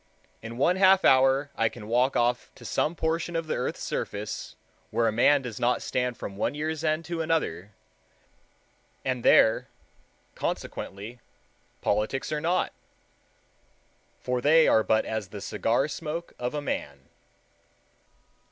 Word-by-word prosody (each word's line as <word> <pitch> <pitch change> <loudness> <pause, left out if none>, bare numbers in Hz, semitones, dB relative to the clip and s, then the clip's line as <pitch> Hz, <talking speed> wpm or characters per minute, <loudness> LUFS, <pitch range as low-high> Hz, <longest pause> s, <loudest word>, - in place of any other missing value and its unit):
In 115 +1 -8
one 175 +8 +3
half 190 0 +5
hour 135 +2 +4
I 115 0 +2
can 110 -3 -11
walk 125 +4 +2
off 120 +1 +1
to - - -14
some 160 - 0
portion 165 +1 -1
of 165 0 -1
the 155 - -2
earth's - - -3
surface 105 +1 -4 0.3
where 115 - +1
a - - +2
man 135 +5 +4
does 125 -1 -6
not 120 0 +1
stand 125 -1 -1
from 100 - -7
one 125 - -1
year's 155 +1 -3
end 155 +1 0
to 170 -1 -3
another, 160 - -1 1.4
and 125 -2 -1
there, 110 - +5 0.7
consequently, 105 +5 -5 0.6
politics 105 +8 -1
are 150 -1 -1
not, 175 +3 0 1.5
for 125 -1 -2
they 160 +4 +5
are 110 - +5
but 110 0 +2
as 110 -3 -3
the 100 +2 -8
cigar 115 +7 0
smoke 155 +3 -5
of 125 +4 -3
a 145 - -3
man. 70 - -4
130 Hz, 145 wpm, -27 LUFS, 115-155 Hz, 1.5 s, half